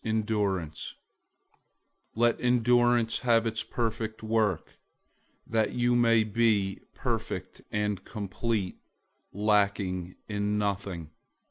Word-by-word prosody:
001:004 105 -7 -1 1.2
Let 120 +1 +2
endurance 120 -1 +3
have 115 -2 +3
its 110 0 -1
perfect 110 -2 -3
work, 110 -6 0 0.7
that 110 -1 0
you 120 0 +2
may 115 -2 +5
be 105 -3 +1 0.2
perfect - - -3
and 105 -2 -1
complete, 105 -1 -3 0.5
lacking 100 -3 +1
in 105 0 -1
nothing. 100 -6 -2
110 Hz, 90 wpm, -28 LUFS, 100-115 Hz, 1.2 s, may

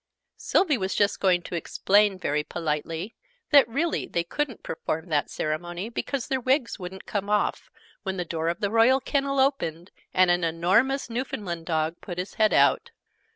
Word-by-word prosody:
Sylvie 305 - +2
was 190 0 -2
just 205 -1 +2
going 180 -2 +2
to - - -9
explain, 200 +4 +2
very 150 -4 -1
politely, 165 +5 -3 0.4
that 280 -5 +7
really 320 +8 -1
they 170 - -1
couldn't 255 +7 -3
perform 160 +1 -4
that 150 -2 +1
ceremony, 175 +6 -3
because 255 +2 -3
their 265 -1 -1
wigs 260 -2 +1
wouldn't 185 +1 -8
come 205 -1 -3
off, 210 0 0 0.3
when 190 -1 -4
the 180 - -2
door 165 -1 -3
of 170 - -3
the 205 -1 0
Royal 230 +4 +5
Kennel 275 0 -1
opened, 180 - 0 0.2
and 185 -1 +4
an 175 0 +1
enormous 190 +12 +2
Newfoundland 205 -9 -4
Dog 160 0 0
put 175 -2 -7
his 180 +2 -4
head 215 -1 +3
out. 475 - +3
190 Hz, 170 wpm, -26 LUFS, 170-240 Hz, 0.4 s, that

